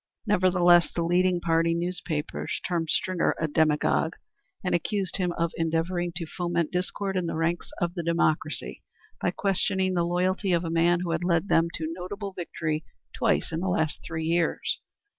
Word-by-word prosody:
Nevertheless 180 -4 +4
the 170 - -1
leading 180 +1 +2
party 165 0 +2
newspapers 170 -3 -3
termed 170 -3 -1
Stringer 185 +1 +1
a 160 - +1
demagogue, 155 +1 +2 0.5
and 180 - 0
accused 190 +3 0
him 180 -2 0
of 170 -1 -1
endeavoring 165 +2 0
to 165 -1 -3
foment 170 -1 -1
discord 190 +2 -2
in 180 -2 0
the - - -2
ranks 165 +2 -1
of 175 0 0
the 175 - -3
Democracy 160 -2 0 0.4
by - - +2
questioning 190 -1 +1
the 175 -1 +2
loyalty 180 +2 +1
of 170 0 +2
a 165 - -2
man 170 +1 +3
who 175 -2 -2
had 165 +1 -1
led 175 +2 +1
them 165 +1 +4
to 160 0 -3
notable 195 +3 -6
victory 160 -3 -3 0.3
twice 75 - +1
in 160 - -2
the 190 +2 -1
last 160 -3 0
three 160 -1 -4
years. 170 0 0
170 Hz, 170 wpm, -27 LUFS, 165-180 Hz, 0.5 s, Nevertheless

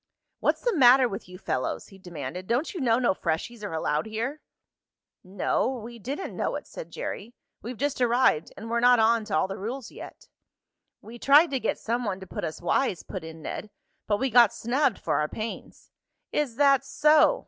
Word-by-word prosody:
"What's - - +1
the 480 -4 0
matter 255 -2 +7
with 195 -4 -7
you 180 - -10
fellows?" 160 -8 -3
he 195 - -15
demanded. 175 0 -7
"Don't 250 +7 0
you 360 - -5
know 230 -3 +3
no 245 -6 +2
freshies 185 +7 -3
are 205 - -4
allowed 155 +1 -1
here?" 235 +7 -4 0.8
"No, 190 +6 0
we 240 -2 -7
didn't 275 - -5
know - - -1
it," - - -6
said - - -9
Jerry. 245 - -6 0.3
"We've 240 +2 -7
just 280 0 -1
arrived, 240 -9 +3
and 220 - -8
we're 235 - +2
not 245 +1 +6
on 225 0 +3
to 205 -7 0
all 170 - +2
the 195 +2 -6
rules 235 +5 -5
yet." - - -11 0.8
"We 235 +2 -11
tried 290 +6 +6
to 265 - 0
get 225 - -1
some 235 +2 -2
one 195 -4 -2
to 190 - -9
put - - -6
us 155 +2 -5
wise," 200 0 0
put 185 -4 -7
in 160 -1 -10
Ned, 215 - -5 0.4
"but 205 - +2
we 265 +3 -1
got 235 -2 +7
snubbed 255 0 0
for - - -1
our 150 0 0
pains." 220 +1 -7 0.4
"Is 285 -6 -1
that 275 0 +4
so?" 305 - +4
230 Hz, 200 wpm, -26 LUFS, 190-265 Hz, 0.8 s, matter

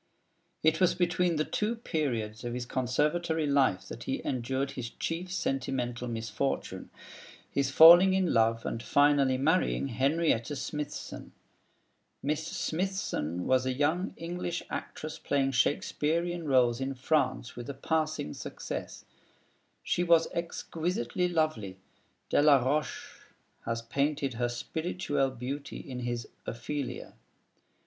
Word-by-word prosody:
It 160 +2 +3
was 180 -1 +4
between 175 -1 +1
the 155 0 +1
two 215 +3 -1
periods 120 - -2
of 120 0 -3
his 125 0 -3
Conservatory 150 +6 0
life 130 -10 +2
that 115 - -8
he 135 - -1
endured 130 +2 -1
his 120 -3 -5
chief 175 +7 -4
sentimental 125 -7 -2
misfortune, 115 +4 -3 0.6
his 140 -1 +1
falling 175 +6 +9
in 185 -3 +2
love 115 0 +3
with - - -14
and 115 - -3
finally 145 -2 +3
marrying 150 0 +1
Henrietta 140 +1 +1
Smithson. 150 +1 -5 0.9
Miss 155 +3 -1
Smithson 160 - -2
was 130 0 +2
a 130 - +1
young 155 +8 0
English 175 +1 -4
actress 155 0 -5
playing 135 -1 +1
Shakespearean 165 +5 0
roles 125 -2 +3
in 135 0 -2
France 130 -3 0
with 120 +2 -7
a 140 - -4
passing 155 - -1
success. - - -6 0.8
She 175 - +1
was 170 -2 +5
exquisitely 170 -1 -2
lovely 155 - -1 0.5
Delaroche 145 -1 +2 0.5
has 115 0 -2
painted 140 +2 0
her 120 +1 -1
spirituelle 145 +2 -1
beauty 130 +3 -5
in 125 -2 -7
his 120 -1 -3 0.2
'Ophelia.' 130 +4 -4
140 Hz, 120 wpm, -30 LUFS, 125-160 Hz, 0.9 s, falling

